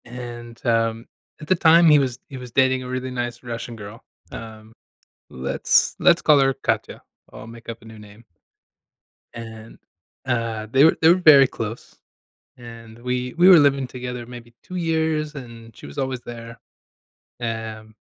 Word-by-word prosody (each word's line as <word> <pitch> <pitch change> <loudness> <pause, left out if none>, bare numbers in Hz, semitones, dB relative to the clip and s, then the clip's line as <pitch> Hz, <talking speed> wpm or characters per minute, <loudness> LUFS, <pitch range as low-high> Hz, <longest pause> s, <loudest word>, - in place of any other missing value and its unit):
And, 120 -1 -9
um, 115 -1 0 0.3
at 150 - -10
the 185 - +3
time, 165 0 +5
he 150 - +7
was 130 -4 -1
he 135 - -8
was 125 -1 -10
dating 130 0 +2
a - - -8
really 130 0 -4
nice 120 -1 -5
Russian 120 -1 -7
girl, 110 +3 -11 0.3
um, 110 -1 -10 0.6
let's 65 +1 +1
let's - - +4
call 150 - +5
her 135 0 +2
Katya, - - -3 0.3
I'll - - -11
make 115 +1 -12
up 115 0 -7
a - - -17
new 110 0 -12
name. 105 +2 -15 1.1
And, 115 -1 -10 0.5
uh, 115 -3 -2
they 135 +3 +5
were 160 - +4
they 160 - +6
were 170 - +7
very 155 -7 +7
close, 115 -1 -7 0.6
and, 115 -2 -12
we 125 0 -3
we 175 +2 +6
were 185 - +9
living 140 -2 +2
together, 125 -1 -7
maybe 120 -1 -12
2 185 - -10
years, 160 -3 -1
and 115 -4 -11
she - - -12
was - - -11
always 130 -2 -2
there. 115 0 -9 0.8
Am, 110 -2 -6
120 Hz, 165 wpm, -22 LUFS, 115-135 Hz, 1.1 s, were